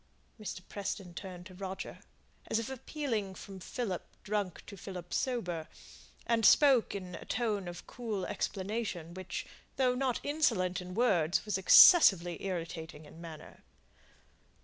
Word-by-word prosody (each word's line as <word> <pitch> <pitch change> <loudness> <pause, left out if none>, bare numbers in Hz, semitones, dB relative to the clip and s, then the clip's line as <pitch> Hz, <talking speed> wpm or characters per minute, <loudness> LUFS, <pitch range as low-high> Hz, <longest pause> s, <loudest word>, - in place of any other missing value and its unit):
Mr. 210 -3 -6
Preston 195 -3 -5
turned 180 -1 -8
to 185 - -11
Roger, 190 +1 -6 0.5
as - - +1
if 230 +3 -3
appealing 235 -7 -3
from 195 0 -9
Philip 190 0 -3 0.2
drunk 205 -3 -2
to 200 - -9
Philip 180 -2 -8
sober, 180 -11 -1 0.6
and 230 -1 +1
spoke 260 -2 +6
in 185 -2 -6
a - - -7
tone 215 -5 -1
of 175 0 -8
cool 220 -6 -4
explanation, 195 -4 -3
which, 185 -1 -5 0.3
though 255 -2 +3
not 255 -1 0
insolent 225 - +1
in 180 0 -8
words, 190 -9 +2
was 205 -3 -1
excessively 185 - +7
irritating 165 -4 -5
in 160 +3 -13
manner. 160 -3 -10
195 Hz, 135 wpm, -32 LUFS, 180-230 Hz, 0.6 s, excessively